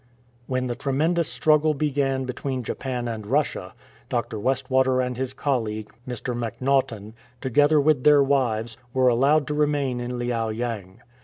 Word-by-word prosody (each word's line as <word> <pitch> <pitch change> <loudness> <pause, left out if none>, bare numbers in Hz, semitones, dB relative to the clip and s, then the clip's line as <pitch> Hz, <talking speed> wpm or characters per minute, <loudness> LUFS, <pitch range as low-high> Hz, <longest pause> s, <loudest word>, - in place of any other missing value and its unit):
When 130 -1 -1
the 125 - -2
tremendous 155 +6 0
struggle 155 +5 +3
began 135 -2 0
between 130 0 -3
Japan 125 0 -3
and 110 -2 -4
Russia, 145 +5 -1 0.3
Dr. 120 -4 -2
Westwater 130 +2 +1
and 125 -1 -1
his 130 +1 -3
colleague, 110 -6 -2
Mr. 125 0 -4
Mac 115 -3 -4
Naughtan, 125 -6 0 0.3
together 145 +4 +3
with 145 -3 +2
their 145 -1 +6
wives, 120 -5 0 0.2
were 130 -1 +4
allowed 140 +5 +3
to 150 - -3
remain 145 -4 0
in 120 0 -4
Liao 120 -2 -1
yang. 110 -4 -5
130 Hz, 150 wpm, -24 LUFS, 120-140 Hz, 0.3 s, their